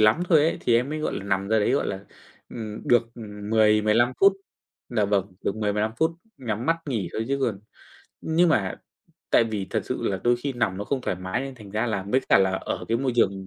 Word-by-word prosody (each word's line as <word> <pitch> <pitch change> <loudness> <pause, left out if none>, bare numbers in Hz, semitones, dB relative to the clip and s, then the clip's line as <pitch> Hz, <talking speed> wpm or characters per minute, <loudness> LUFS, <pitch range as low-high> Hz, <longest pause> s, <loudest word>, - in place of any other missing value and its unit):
lắm 110 +11 +4
thôi 160 -4 +6
ấy, 165 - +1
thì 120 - +2
em 125 +3 +2
mới, 155 - -3
gọi 155 - -2
là, 95 - -5
nằm 100 0 -1
ra 110 0 +3
đấy, 105 - +2
gọi 140 - +1
là, 95 -1 -4 0.5
ừm, 110 -2 -7
được, 120 -1 +3
ừm, 105 -2 -8
10-15 110 +2 +4
phút 195 0 +7 0.6
dạ 110 -4 +1
vâng, 100 -1 0
được 100 - -1
10-15 105 0 0
phút, 160 +1 +2 0.3
nhắm 115 -1 -4
mắt 165 - +3
nghỉ 110 -10 -2
thôi 110 - -2
chứ 140 0 0
còn 110 -7 -1 0.6
nhưng 165 +2 +2
mà 100 -11 +1 0.5
tại 115 - +5
vì 105 -4 -3
thật - - 0
sự - - -4
là 95 -2 -1
đôi 120 0 +4
khi 135 +3 -3
nằm 115 -7 -1
nó 100 - -4
không 140 +2 -1
thoải 110 - -2
mái 95 +5 -3
nên 135 0 -6
thành 105 -5 -13
ra 110 +3 -1
là 100 -4 -1
với 130 +4 +3
cả - - +6
là 95 -1 +3
ở 95 - -3
cái 115 +1 +1
môi 130 -2 0
trường 95 -4 +1
110 Hz, 240 wpm, -25 LUFS, 100-125 Hz, 0.6 s, phút